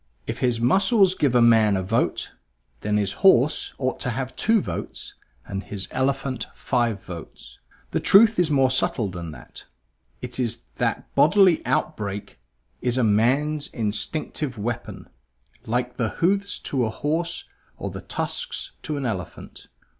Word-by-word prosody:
If -, -, -4 dB
his 125 Hz, -2 st, +1 dB
muscles 190 Hz, -, +4 dB
give 145 Hz, -9 st, +1 dB
a 120 Hz, -, +6 dB
man 110 Hz, -3 st, +5 dB
a 95 Hz, -, -2 dB
vote, 115 Hz, +5 st, 0 dB, 0.5 s
then 105 Hz, 0 st, 0 dB
his 100 Hz, -2 st, 0 dB
horse 150 Hz, -7 st, +4 dB
ought 130 Hz, -1 st, -2 dB
to -, -, -1 dB
have 130 Hz, +2 st, -4 dB
two 225 Hz, 0 st, +3 dB
votes -, -, -5 dB, 0.3 s
and 95 Hz, -1 st, -4 dB
his 100 Hz, -1 st, -5 dB
elephant 130 Hz, -2 st, -1 dB
five 120 Hz, -6 st, -1 dB
votes. 85 Hz, -2 st, -10 dB, 0.3 s
The -, -, 0 dB
truth 215 Hz, 0 st, +6 dB
is 175 Hz, -3 st, +3 dB
more 135 Hz, -3 st, +3 dB
subtle 120 Hz, -4 st, 0 dB
than 85 Hz, -2 st, -6 dB
that; -, -, -12 dB, 0.5 s
it 125 Hz, 0 st, -7 dB
is 120 Hz, -2 st, -1 dB
that -, -, -2 dB
bodily 185 Hz, 0 st, +5 dB
outbreak 105 Hz, -9 st, -2 dB, 0.4 s
is 125 Hz, 0 st, 0 dB
a 130 Hz, -, +3 dB
man's 135 Hz, +8 st, +2 dB
instinctive 120 Hz, +5 st, -3 dB
weapon, 110 Hz, -3 st, -5 dB, 0.6 s
like 125 Hz, +2 st, -1 dB
the 115 Hz, -3 st, 0 dB
hoofs 195 Hz, -, 0 dB
to 135 Hz, -, -3 dB
the 115 Hz, -3 st, +2 dB
horse 160 Hz, +8 st, -2 dB, 0.3 s
or -, -, -5 dB
the -, -, -7 dB
tusks -, -, -3 dB
to 150 Hz, -2 st, -3 dB
the 135 Hz, -, -2 dB
elephant. 95 Hz, -7 st, -6 dB
125 Hz, 150 wpm, -24 LUFS, 110-155 Hz, 0.6 s, a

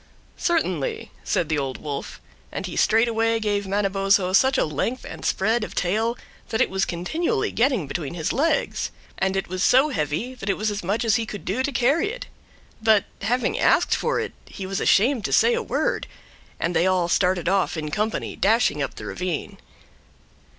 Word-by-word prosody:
"Certainly," 185 Hz, -, -1 dB
said 170 Hz, -, 0 dB
the 150 Hz, -1 st, 0 dB
Old 135 Hz, -2 st, -3 dB
Wolf; 145 Hz, -2 st, -6 dB, 0.3 s
and -, -, -4 dB
he -, -, -6 dB
straightway 225 Hz, 0 st, +2 dB
gave 205 Hz, -2 st, -1 dB
Manabozho 195 Hz, -1 st, +1 dB
such 265 Hz, +6 st, +4 dB
a -, -, +3 dB
length 165 Hz, -, -2 dB
and -, -, -9 dB
spread 220 Hz, +4 st, +1 dB
of -, -, -7 dB
tail 220 Hz, +7 st, 0 dB, 0.3 s
that 220 Hz, -, -1 dB
it -, -, +2 dB
was 190 Hz, 0 st, +1 dB
continually 340 Hz, -, -1 dB
getting 240 Hz, -, +1 dB
between 145 Hz, +2 st, -4 dB
his 160 Hz, -1 st, -2 dB
legs, 315 Hz, +5 st, 0 dB, 0.3 s
and 190 Hz, 0 st, +1 dB
it 195 Hz, -, -2 dB
was 185 Hz, +1 st, -4 dB
so 265 Hz, +8 st, +5 dB
heavy 160 Hz, -, -2 dB
that 205 Hz, -6 st, -6 dB
it 195 Hz, -, +1 dB
was 215 Hz, 0 st, 0 dB
as 205 Hz, -1 st, -4 dB
much 205 Hz, +6 st, -1 dB
as 220 Hz, -1 st, +4 dB
he 225 Hz, -1 st, -3 dB
could 205 Hz, -, -7 dB
do 215 Hz, +8 st, -1 dB
to 285 Hz, -, -1 dB
carry 275 Hz, -, +2 dB
it. -, -, -6 dB, 0.6 s
But, 220 Hz, -2 st, +4 dB, 0.2 s
having 240 Hz, +5 st, 0 dB
asked -, -, +3 dB
for 485 Hz, -, 0 dB
it, -, -, -4 dB
he 195 Hz, -, -7 dB
was 195 Hz, +1 st, -3 dB
ashamed 235 Hz, +3 st, +3 dB
to -, -, -2 dB
say 475 Hz, -, +5 dB
a 475 Hz, -, 0 dB
word, -, -, -1 dB, 0.5 s
and 170 Hz, +1 st, -1 dB
they 175 Hz, -, +3 dB
all 185 Hz, -2 st, +2 dB
started 180 Hz, -1 st, +1 dB
off 190 Hz, -2 st, +1 dB
in 150 Hz, -1 st, -4 dB
company, 215 Hz, +6 st, -2 dB
dashing 215 Hz, -7 st, +2 dB
up 135 Hz, -, -3 dB
the -, -, -8 dB
ravine. 180 Hz, -4 st, -4 dB
205 Hz, 190 wpm, -24 LUFS, 180-240 Hz, 0.6 s, so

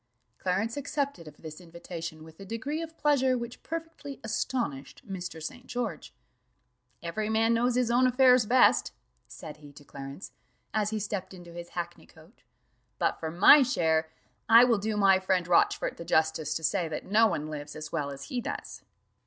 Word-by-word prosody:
Clarence 200 Hz, +7 st, -1 dB
accepted 280 Hz, -, -3 dB
of 150 Hz, -, -12 dB
this 160 Hz, +1 st, -10 dB
invitation 165 Hz, -2 st, -8 dB
with 160 Hz, 0 st, -15 dB
a -, -, -8 dB
degree 230 Hz, -, -4 dB
of 325 Hz, 0 st, -8 dB
pleasure 265 Hz, -4 st, +2 dB
which 235 Hz, 0 st, -7 dB
perfectly 325 Hz, -4 st, -7 dB
astonished 220 Hz, -, -3 dB
Mr. 180 Hz, -4 st, -6 dB
St. 245 Hz, +10 st, -8 dB
George. 230 Hz, -11 st, -4 dB, 0.9 s
"Every 210 Hz, +6 st, -3 dB
man 225 Hz, +1 st, +3 dB
knows 240 Hz, +1 st, +1 dB
his 250 Hz, -2 st, +1 dB
own 250 Hz, +2 st, +4 dB
affairs 250 Hz, -2 st, +5 dB
best," 255 Hz, +2 st, +4 dB, 0.3 s
said 150 Hz, -2 st, -10 dB
he 145 Hz, -1 st, -14 dB
to 145 Hz, -, -14 dB
Clarence, 140 Hz, +5 st, -9 dB, 0.4 s
as 210 Hz, -1 st, +1 dB
he 220 Hz, -, -2 dB
stepped 200 Hz, -2 st, -4 dB
into 175 Hz, -2 st, -12 dB
his 175 Hz, 0 st, -8 dB
hackney 175 Hz, 0 st, -5 dB
coach; 160 Hz, +6 st, -21 dB, 0.5 s
"but -, -, 0 dB
for 160 Hz, -, -3 dB
my 190 Hz, -, +7 dB
share, 160 Hz, -10 st, +1 dB, 0.4 s
I 230 Hz, +1 st, +9 dB
will 235 Hz, -4 st, +3 dB
do 215 Hz, +1 st, -2 dB
my 195 Hz, -2 st, +5 dB
friend 185 Hz, -2 st, 0 dB
Rochfort 175 Hz, -, +2 dB
the -, -, -7 dB
justice 160 Hz, -2 st, +1 dB
to 160 Hz, -, -4 dB
say 175 Hz, +1 st, +1 dB
that 155 Hz, -, -5 dB
no 220 Hz, +3 st, +4 dB
one 165 Hz, -7 st, -2 dB
lives 145 Hz, -1 st, -7 dB
as 155 Hz, -1 st, -7 dB
well 150 Hz, -4 st, -2 dB
as 140 Hz, 0 st, -8 dB
he 245 Hz, -, -4 dB
does." -, -, -6 dB
195 Hz, 175 wpm, -28 LUFS, 160-245 Hz, 0.9 s, I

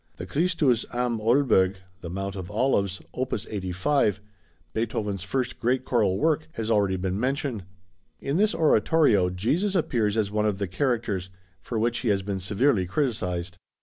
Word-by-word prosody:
The 90 Hz, -, -6 dB
Christus 145 Hz, -, +1 dB
am 120 Hz, -2 st, -1 dB
Oelberg 110 Hz, -5 st, +3 dB, 0.2 s
(The 85 Hz, -, -7 dB
Mount 95 Hz, +2 st, -4 dB
of 95 Hz, -2 st, -6 dB
Olives), 105 Hz, -4 st, 0 dB
opus 125 Hz, -4 st, -2 dB
85, 100 Hz, +4 st, 0 dB, 0.5 s
Beethoven's 105 Hz, -3 st, -2 dB
first 125 Hz, +6 st, -2 dB
great 125 Hz, +2 st, 0 dB
choral 105 Hz, -7 st, +2 dB
work, 155 Hz, +2 st, +1 dB
has 115 Hz, 0 st, -3 dB
already 100 Hz, -3 st, +2 dB
been 95 Hz, +1 st, -2 dB
mentioned. 130 Hz, -5 st, -2 dB, 0.5 s
In 140 Hz, +4 st, -1 dB
this 215 Hz, +2 st, +2 dB
oratorio 145 Hz, -, +3 dB
Jesus 150 Hz, -, 0 dB
appears 115 Hz, -, +1 dB
as 105 Hz, -2 st, 0 dB
one 105 Hz, 0 st, +1 dB
of 105 Hz, -2 st, 0 dB
the 100 Hz, -1 st, -2 dB
characters, 110 Hz, -4 st, -1 dB, 0.3 s
for 115 Hz, -, -4 dB
which 115 Hz, +2 st, +1 dB
he 125 Hz, -, -3 dB
has 100 Hz, -2 st, +2 dB
been 100 Hz, 0 st, -3 dB
severely 100 Hz, +1 st, +1 dB
criticised. 90 Hz, -, -2 dB
110 Hz, 155 wpm, -26 LUFS, 95-130 Hz, 0.5 s, Oelberg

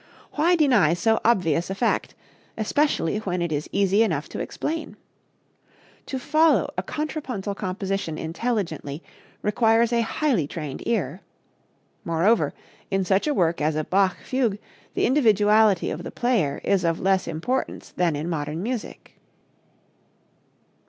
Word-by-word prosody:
Why 335 Hz, +4 st, +3 dB
deny 245 Hz, -, +4 dB
so 225 Hz, +6 st, +2 dB
obvious 175 Hz, -7 st, +2 dB
a 195 Hz, -, -3 dB
fact, 230 Hz, +3 st, 0 dB, 0.4 s
especially 220 Hz, -, +1 dB
when 180 Hz, -4 st, -2 dB
it 170 Hz, -1 st, -1 dB
is 150 Hz, 0 st, -2 dB
easy 200 Hz, +1 st, +3 dB
enough 165 Hz, -10 st, 0 dB
to -, -, -6 dB
explain? 320 Hz, +2 st, -4 dB, 1.1 s
To 265 Hz, -, -3 dB
follow 300 Hz, -, +2 dB
a 185 Hz, -, -1 dB
contrapuntal 255 Hz, -, -4 dB
composition 195 Hz, -4 st, -3 dB
intelligently 165 Hz, -, -3 dB, 0.4 s
requires 225 Hz, +2 st, +3 dB
a 235 Hz, -, +3 dB
highly 230 Hz, -, 0 dB
trained 150 Hz, -4 st, -6 dB
ear. 200 Hz, -5 st, -1 dB, 0.8 s
Moreover, 170 Hz, +8 st, +2 dB, 0.4 s
in 195 Hz, -1 st, 0 dB
such 195 Hz, +8 st, +2 dB
a 300 Hz, -, +2 dB
work 170 Hz, -5 st, +1 dB
as 155 Hz, +1 st, +1 dB
a 155 Hz, -, 0 dB
Bach 190 Hz, +2 st, +2 dB
fugue 245 Hz, -6 st, 0 dB, 0.4 s
the -, -, +2 dB
individuality 215 Hz, -, +4 dB
of 155 Hz, -, -5 dB
the -, -, -5 dB
player 225 Hz, -, 0 dB
is 195 Hz, -2 st, +2 dB
of 165 Hz, -1 st, +1 dB
less 190 Hz, 0 st, +1 dB
importance 170 Hz, +12 st, -3 dB
than 175 Hz, -4 st, 0 dB
in 150 Hz, +3 st, -3 dB
modern 155 Hz, 0 st, -3 dB
music. 240 Hz, 0 st, -6 dB
195 Hz, 135 wpm, -24 LUFS, 170-235 Hz, 1.1 s, deny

